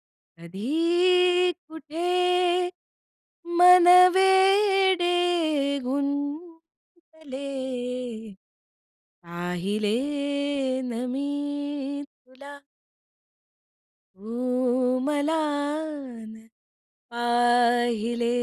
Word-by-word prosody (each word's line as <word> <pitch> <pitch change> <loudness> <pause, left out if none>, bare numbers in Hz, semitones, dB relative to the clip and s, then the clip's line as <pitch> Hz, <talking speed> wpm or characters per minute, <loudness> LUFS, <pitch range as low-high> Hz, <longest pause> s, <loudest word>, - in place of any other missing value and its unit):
कधी, 345 - 0 0.2
कुठे, 320 +2 -5 1.5
मन 360 0 +7 0.3
वेडे 380 -1 +3 0.7
गुंतले 285 +1 -6 1.8
पाहिले 180 +5 -3 0.9
ना 240 +2 -4
मी 285 0 -4
तुला. 280 +1 -16 1.6
तू 250 +3 -1
मला 295 +1 0 0.9
ना 220 0 -14 0.6
पाहिले 240 -1 +1
285 Hz, 40 wpm, -25 LUFS, 240-335 Hz, 1.8 s, मन